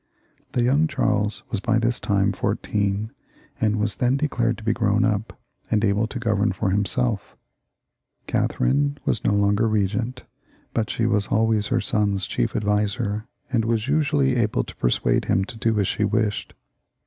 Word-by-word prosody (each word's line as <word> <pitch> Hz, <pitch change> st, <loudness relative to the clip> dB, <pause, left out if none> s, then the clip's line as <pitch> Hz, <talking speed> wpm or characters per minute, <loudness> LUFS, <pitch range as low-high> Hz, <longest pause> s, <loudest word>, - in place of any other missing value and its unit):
The 120 Hz, -, +1 dB
young 140 Hz, +6 st, +3 dB
Charles 105 Hz, -7 st, 0 dB
was 110 Hz, -, 0 dB
by 110 Hz, +2 st, +1 dB
this 120 Hz, +1 st, 0 dB
time 100 Hz, -2 st, +1 dB
fourteen, 100 Hz, +2 st, -1 dB, 0.5 s
and 110 Hz, -3 st, +2 dB
was 105 Hz, 0 st, -1 dB
then 125 Hz, +2 st, +2 dB
declared 120 Hz, -6 st, 0 dB
to 110 Hz, -, -11 dB
be 110 Hz, 0 st, +1 dB
grown 110 Hz, 0 st, +2 dB
up, 110 Hz, +2 st, -2 dB, 0.3 s
and 110 Hz, 0 st, +2 dB
able 105 Hz, +2 st, +1 dB
to 125 Hz, -, -6 dB
govern 110 Hz, -4 st, +1 dB
for 95 Hz, 0 st, -1 dB
imself. 95 Hz, -11 st, -1 dB
y -, -, -38 dB, 0.9 s
Catherine 145 Hz, +1 st, +1 dB
was -, -, 0 dB
no -, -, +2 dB
longer 100 Hz, +2 st, +2 dB
regent, 110 Hz, +4 st, -1 dB, 0.5 s
but 110 Hz, -2 st, -1 dB
she 115 Hz, -, -1 dB
was 105 Hz, -3 st, +1 dB
jJways 110 Hz, -1 st, +2 dB
her 125 Hz, -2 st, +1 dB
son's 100 Hz, -4 st, 0 dB
chief -, -, -2 dB
adviser, 105 Hz, +1 st, -1 dB, 0.2 s
and 120 Hz, -3 st, +2 dB
was 115 Hz, 0 st, 0 dB
usually 145 Hz, -3 st, +2 dB
able 105 Hz, -, +1 dB
to -, -, -10 dB
persuade -, -, +1 dB
him 95 Hz, -, +1 dB
to 115 Hz, -, -9 dB
do 110 Hz, -1 st, 0 dB
as 100 Hz, -, +1 dB
she 105 Hz, -, -1 dB
wished. 105 Hz, 0 st, -1 dB
110 Hz, 170 wpm, -23 LUFS, 100-120 Hz, 0.9 s, young